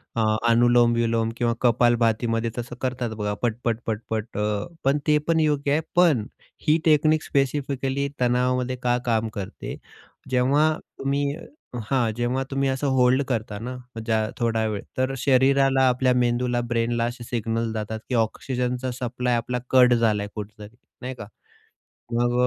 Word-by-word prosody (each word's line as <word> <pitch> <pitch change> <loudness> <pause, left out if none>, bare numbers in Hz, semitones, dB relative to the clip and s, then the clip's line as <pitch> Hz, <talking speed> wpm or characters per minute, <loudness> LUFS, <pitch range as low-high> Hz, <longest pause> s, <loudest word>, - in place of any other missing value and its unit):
अ, 115 - +1 0.3
अनुलोम 120 0 +4
विलोम 115 -1 +1
किंवा 120 -1 +1
कपालभातीमध्ये 115 -1 +2
तसं 120 0 -5
करतात, 125 -2 -2
बघा 105 -1 -2
पटपट-पटपट. 115 -2 -2
अ, 105 -1 -1 0.2
पण 135 +2 +3
ते 150 0 +5
पण 165 -1 +3
योग्य 145 -2 +1
आहे. 155 +3 +2
पण 165 -11 +4 0.4
ही 155 - +5
टेक्निक 155 0 +4
स्पेसिफिकली 140 0 -1
तणावामध्ये 125 +1 +1
का 120 0 +2
काम 115 -1 +1
करते? 100 -2 -6 0.5
जेव्हा 140 +5 +3 0.3
तुम्ही 140 +1 0 0.7
हां, 125 -5 +2
जेव्हा 125 +2 0
तुम्ही 135 0 +1
असं 135 +2 -1
होल्ड 130 +1 +4
करता 110 -4 -2
ना 125 +3 -5 0.2
मग 115 - -5
ज्या 110 -1 +1
थोडा 115 -2 0
वेळ, 105 -2 -3 0.2
तर 130 +1 0
शरीराला, 135 +1 +3
आपल्या 125 0 +2
मेंदूला, 120 0 +1
ब्रेनला 115 0 0
असे 120 0 -5
सिग्नल 115 -1 -2
जातात, 110 0 -4
की 125 - 0
ऑक्सिजनचा 125 +2 -1
सप्लाय 125 0 -1
आपला 125 +2 -2
कट 125 -1 +6
झालाय 110 -3 +1
कुठेतरी, 105 +1 -8 0.3
नाही 130 0 -4
का? 105 - -8 0.9
मग 120 +1 +1
120 Hz, 145 wpm, -24 LUFS, 115-130 Hz, 0.9 s, कट